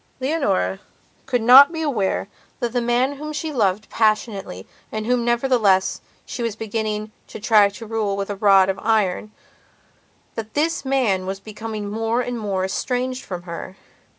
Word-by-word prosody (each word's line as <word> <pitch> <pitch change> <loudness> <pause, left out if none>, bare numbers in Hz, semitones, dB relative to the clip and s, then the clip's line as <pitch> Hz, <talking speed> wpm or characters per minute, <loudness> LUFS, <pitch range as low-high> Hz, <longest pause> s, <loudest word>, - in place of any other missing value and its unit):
Leonora 260 - 0 0.5
could 245 -3 0
not 265 +6 +9
be 320 -1 -3
aware 215 -10 -1 0.3
that 240 -1 -2
the 245 - +1
man 245 +4 +1
whom 305 +2 -6
she 305 +1 -4
loved 210 -4 0
passionately 215 - 0 0.3
and 215 0 -4
whom, 245 0 +1
nevertheless, 235 -6 +2 0.2
she - - -6
was 230 -3 -2
beginning 215 -1 -3 0.2
to - - -9
try 210 -1 +5
to 210 +3 -10
rule 215 -3 -2
with 200 0 -3
a - - -3
rod 195 -2 +5
of 195 0 -1
ironthat 215 -2 0 1.3
this 315 +2 0
man 240 -9 +1
was 195 0 -4
becoming 215 0 -6
more 225 +3 -1
and 245 -1 -4
more 195 -3 -1
estranged 255 +5 -2
from 180 -3 -6
her. 175 +1 -7
220 Hz, 155 wpm, -22 LUFS, 200-250 Hz, 1.3 s, not